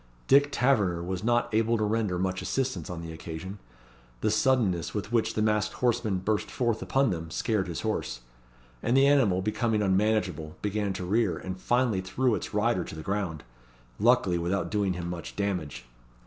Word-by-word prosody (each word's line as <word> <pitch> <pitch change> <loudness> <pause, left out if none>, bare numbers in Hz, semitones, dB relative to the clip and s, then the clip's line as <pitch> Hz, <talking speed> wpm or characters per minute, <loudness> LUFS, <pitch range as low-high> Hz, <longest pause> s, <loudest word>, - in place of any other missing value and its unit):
Dick 140 +1 +5
Taverner 105 -12 +2
was 90 +2 -4
not 120 +1 +2
able 115 +1 +2
to 110 - 0
render 105 -3 0
much 95 +1 -1
assistance 130 -4 -2
on 85 -2 -5
the 80 0 -7
occasion. 85 +5 -7 0.6
The 110 - +2
suddenness 110 -8 +1
with 105 +1 -3
which 115 -2 +1
the 110 - +1
masked 105 -1 +1
horseman 120 -5 +1
burst 105 +3 -1
forth 120 -3 -1
upon 135 -2 +2
them 80 -2 -4
scared 100 +2 -1
his 85 -3 -4
horse; - - -2 0.6
and 120 +3 +2
the 135 - +6
animal 120 -11 +3
becoming 110 +1 0
unmanageable, 95 -6 0
began 105 -1 -1
to 90 - -5
rear, 100 -3 +1
and 95 +2 -6
finally 120 -6 +1
threw 120 +7 0
its - - -3
rider 105 -2 +1
to - - -8
the 80 - -7
ground 95 -6 -2 0.6
luckily 85 -1 +3
without 90 +4 -1
doing 100 -3 +1
him 90 -1 -5
much 85 -1 -6
damage. 85 -12 -3
100 Hz, 175 wpm, -28 LUFS, 90-115 Hz, 0.6 s, the